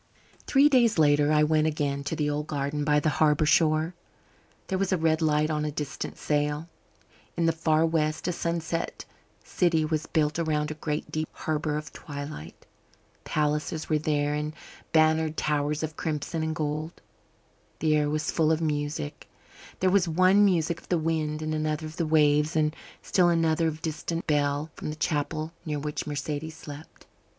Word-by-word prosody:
Three 275 Hz, +1 st, +5 dB
days 240 Hz, -7 st, +4 dB
later 145 Hz, -1 st, +4 dB
I 150 Hz, 0 st, +4 dB
went 155 Hz, 0 st, +3 dB
again 145 Hz, -2 st, -1 dB
to 150 Hz, -, -2 dB
the 150 Hz, -1 st, 0 dB
old 150 Hz, +1 st, -2 dB
garden 145 Hz, 0 st, -2 dB
by 150 Hz, 0 st, +3 dB
the 150 Hz, -, +1 dB
harbour 150 Hz, 0 st, +4 dB
shore. 155 Hz, +2 st, +3 dB, 0.7 s
There 190 Hz, -1 st, -2 dB
was 195 Hz, 0 st, 0 dB
a 185 Hz, -, +3 dB
red 160 Hz, 0 st, +1 dB
light 155 Hz, 0 st, +2 dB
on 150 Hz, -1 st, -1 dB
a 150 Hz, -, -1 dB
distant 150 Hz, -1 st, -5 dB
sail. 150 Hz, +1 st, -1 dB, 0.7 s
In 170 Hz, -, +2 dB
the 165 Hz, -, +4 dB
far 160 Hz, 0 st, +2 dB
west 155 Hz, -1 st, 0 dB
a -, -, +2 dB
sunset 170 Hz, -1 st, -3 dB, 0.4 s
city 165 Hz, -3 st, +1 dB
was 155 Hz, 0 st, -2 dB
built 155 Hz, 0 st, +1 dB
around 150 Hz, -2 st, 0 dB
a 155 Hz, -, -9 dB
great 150 Hz, 0 st, -3 dB
deep 155 Hz, 0 st, -2 dB
harbour 155 Hz, -1 st, -2 dB
of 150 Hz, -1 st, -7 dB
twilight. 145 Hz, -, -8 dB, 0.6 s
Palaces 150 Hz, +1 st, -1 dB
were 155 Hz, -1 st, +2 dB
there 145 Hz, -1 st, 0 dB
and 150 Hz, +1 st, -3 dB, 0.4 s
bannered 155 Hz, 0 st, +3 dB
towers 150 Hz, 0 st, 0 dB
of 155 Hz, -1 st, -4 dB
crimson 155 Hz, +1 st, -2 dB
and 160 Hz, 0 st, -2 dB
gold. 155 Hz, +1 st, -3 dB, 0.8 s
The 155 Hz, -1 st, +2 dB
air 150 Hz, -1 st, +2 dB
was 155 Hz, +1 st, -1 dB
full 160 Hz, -1 st, +2 dB
of 160 Hz, -, +2 dB
music; 145 Hz, -, -3 dB, 0.5 s
there 185 Hz, 0 st, +3 dB
was 190 Hz, -2 st, +3 dB
one 185 Hz, +5 st, +4 dB
music 170 Hz, -4 st, +2 dB
of -, -, -22 dB
the 175 Hz, -, +2 dB
wind 155 Hz, -1 st, -1 dB
and 155 Hz, 0 st, -2 dB
another 155 Hz, 0 st, -1 dB
of 155 Hz, +2 st, -9 dB
the 165 Hz, -, 0 dB
waves, 150 Hz, 0 st, +3 dB
and 155 Hz, 0 st, +1 dB, 0.3 s
still 180 Hz, -2 st, +3 dB
another 165 Hz, -1 st, +2 dB
of 160 Hz, -, -1 dB
the 155 Hz, -, -16 dB
distant 165 Hz, +1 st, -3 dB
bell 145 Hz, 0 st, 0 dB
from -, -, -6 dB
the 150 Hz, -, -4 dB
chapel 155 Hz, +1 st, -2 dB
near 155 Hz, -3 st, -3 dB
which 150 Hz, +1 st, -4 dB
Mercedes 150 Hz, +2 st, -4 dB
slept. 145 Hz, 0 st, -11 dB
155 Hz, 175 wpm, -27 LUFS, 150-160 Hz, 0.8 s, Three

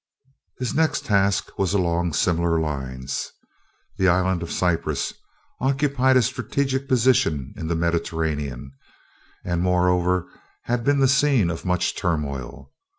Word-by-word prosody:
His 125 Hz, -2 st, -3 dB
next 155 Hz, -2 st, +1 dB
task 100 Hz, -1 st, +1 dB
was 95 Hz, 0 st, +1 dB
along 85 Hz, -3 st, 0 dB
similar 85 Hz, +1 st, +1 dB
lines. 65 Hz, -3 st, -4 dB, 0.7 s
The 95 Hz, -, +3 dB
Island 90 Hz, 0 st, +2 dB
of 85 Hz, -, -5 dB
Cyprus 90 Hz, -2 st, -1 dB, 0.5 s
occupied 135 Hz, -1 st, +2 dB
a 125 Hz, -, +4 dB
strategic 130 Hz, +3 st, -1 dB
position 120 Hz, -, +2 dB
in 80 Hz, -, -5 dB
the 85 Hz, -, 0 dB
Mediterranean, 80 Hz, -5 st, -2 dB, 0.7 s
and 85 Hz, -1 st, -1 dB
moreover 90 Hz, 0 st, +2 dB, 0.4 s
had 120 Hz, 0 st, -1 dB
been 140 Hz, +2 st, +2 dB
the 135 Hz, -, +5 dB
scene 135 Hz, -9 st, +3 dB
of 80 Hz, -, -7 dB
much 90 Hz, -1 st, 0 dB
turmoil. 75 Hz, -8 st, -3 dB
90 Hz, 125 wpm, -23 LUFS, 80-125 Hz, 0.7 s, the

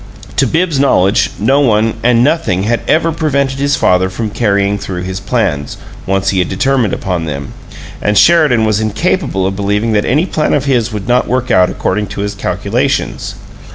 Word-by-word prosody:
To -, -, +3 dB
Bibbs's 165 Hz, -4 st, 0 dB
knowledge, 100 Hz, -8 st, +2 dB
no 130 Hz, +7 st, +2 dB
one 110 Hz, -4 st, +2 dB
and 120 Hz, 0 st, +3 dB
nothing 140 Hz, -, +1 dB
had 115 Hz, +3 st, 0 dB
ever 165 Hz, +1 st, +2 dB
prevented 140 Hz, -4 st, -1 dB
his 140 Hz, +1 st, +1 dB
father 95 Hz, 0 st, +2 dB
from 110 Hz, +2 st, -4 dB
carrying 100 Hz, -2 st, 0 dB
through 90 Hz, -2 st, -5 dB
his 95 Hz, +1 st, -4 dB
plans, 70 Hz, -6 st, -2 dB, 0.3 s
once 95 Hz, 0 st, 0 dB
he 95 Hz, -, 0 dB
had 90 Hz, -, 0 dB
determined 125 Hz, +1 st, 0 dB
upon 90 Hz, -4 st, -3 dB
them; 70 Hz, -3 st, -6 dB, 0.5 s
and 105 Hz, 0 st, +1 dB
Sheridan 150 Hz, -, +4 dB
was 110 Hz, -1 st, +1 dB
incapable 110 Hz, -, -1 dB
of 95 Hz, 0 st, -2 dB
believing 105 Hz, +3 st, -1 dB
that 105 Hz, -1 st, +1 dB
any 150 Hz, +8 st, +1 dB
plan 155 Hz, -6 st, 0 dB
of 140 Hz, -2 st, -1 dB
his 120 Hz, -5 st, +1 dB
would 105 Hz, -1 st, -5 dB
not 125 Hz, +1 st, +2 dB
work 125 Hz, +1 st, -1 dB
out 90 Hz, -1 st, +4 dB
according 105 Hz, +2 st, -2 dB
to 100 Hz, -, -6 dB
his 100 Hz, 0 st, -3 dB
calculations. 100 Hz, -, -2 dB
110 Hz, 185 wpm, -13 LUFS, 95-135 Hz, 0.5 s, Sheridan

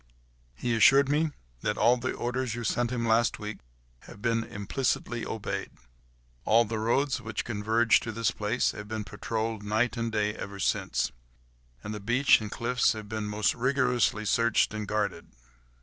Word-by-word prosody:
"He 120 Hz, -1 st, -1 dB
assured 135 Hz, +5 st, +6 dB
me 155 Hz, +2 st, +2 dB, 0.3 s
that 105 Hz, -, -1 dB
all 120 Hz, -, +5 dB
the 125 Hz, +1 st, -3 dB
orders 125 Hz, -1 st, -2 dB
you 120 Hz, -, -5 dB
sent 120 Hz, +2 st, 0 dB
him 120 Hz, -2 st, -2 dB
last 115 Hz, +1 st, +3 dB
week 105 Hz, 0 st, -6 dB, 0.5 s
have -, -, -12 dB
been 115 Hz, 0 st, 0 dB
implicitly 120 Hz, +3 st, -2 dB
obeyed. 110 Hz, -2 st, -4 dB, 0.7 s
All 115 Hz, +2 st, +4 dB
the 110 Hz, 0 st, -3 dB
roads 130 Hz, +5 st, +1 dB
which 110 Hz, -1 st, -4 dB
converge 110 Hz, +1 st, +3 dB
to 110 Hz, -, -5 dB
this 115 Hz, +1 st, 0 dB
place 105 Hz, +4 st, 0 dB
have 105 Hz, -1 st, -8 dB
been 110 Hz, 0 st, -4 dB
patrolled 110 Hz, +1 st, -3 dB
night 110 Hz, +3 st, 0 dB
and 115 Hz, -1 st, -2 dB
day 105 Hz, -1 st, 0 dB
ever 100 Hz, -2 st, -7 dB
since: 95 Hz, -, 0 dB, 0.7 s
and 105 Hz, -, -5 dB
the 105 Hz, -, -5 dB
beach 120 Hz, +5 st, +4 dB
and 105 Hz, -, -5 dB
cliffs 120 Hz, +3 st, +1 dB
have 110 Hz, -1 st, -8 dB
been 110 Hz, 0 st, -3 dB
most 105 Hz, 0 st, +1 dB
rigorously 125 Hz, -4 st, +1 dB
searched 115 Hz, +1 st, +2 dB
and 105 Hz, -1 st, -4 dB
guarded." 100 Hz, -5 st, -2 dB
115 Hz, 165 wpm, -28 LUFS, 105-120 Hz, 0.7 s, assured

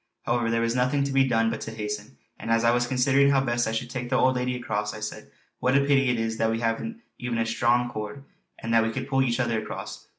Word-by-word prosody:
However 120 Hz, -1 st, 0 dB
there 115 Hz, 0 st, +1 dB
was 115 Hz, +1 st, 0 dB
nothing 130 Hz, +3 st, +2 dB
to 140 Hz, -, -2 dB
be 135 Hz, 0 st, +4 dB
done 115 Hz, -2 st, +2 dB
but -, -, -5 dB
to -, -, -5 dB
hasten; 105 Hz, -6 st, -5 dB, 0.2 s
and -, -, -6 dB
as 115 Hz, 0 st, +3 dB
I 115 Hz, -, +5 dB
was 120 Hz, 0 st, +1 dB
considering 135 Hz, +2 st, +3 dB
how 140 Hz, -1 st, +4 dB
best 120 Hz, -2 st, 0 dB
I -, -, -1 dB
should 120 Hz, +2 st, -3 dB
take 120 Hz, -1 st, -4 dB
the 130 Hz, -, +1 dB
old 130 Hz, 0 st, +3 dB
lady 125 Hz, 0 st, -1 dB
across 125 Hz, -1 st, -3 dB
I -, -, -7 dB
said: -, -, -6 dB, 0.3 s
"What 130 Hz, +3 st, +3 dB
a -, -, +4 dB
pity 140 Hz, -2 st, +3 dB
it 120 Hz, -2 st, +1 dB
is 110 Hz, 0 st, -2 dB
that 110 Hz, -, +2 dB
we 115 Hz, 0 st, -1 dB
haven't 170 Hz, -, -2 dB, 0.2 s
even 125 Hz, -2 st, -2 dB
a 115 Hz, -, +1 dB
strong 120 Hz, +2 st, +2 dB
cord, 120 Hz, +4 st, -6 dB, 0.3 s
and 115 Hz, -, -3 dB
then 115 Hz, -, +6 dB
we 115 Hz, 0 st, 0 dB
could 130 Hz, +2 st, -4 dB
pull 135 Hz, -1 st, +2 dB
each 125 Hz, -2 st, +1 dB
other 115 Hz, -3 st, 0 dB
across." 110 Hz, -, -7 dB
120 Hz, 270 wpm, -26 LUFS, 115-130 Hz, 0.3 s, then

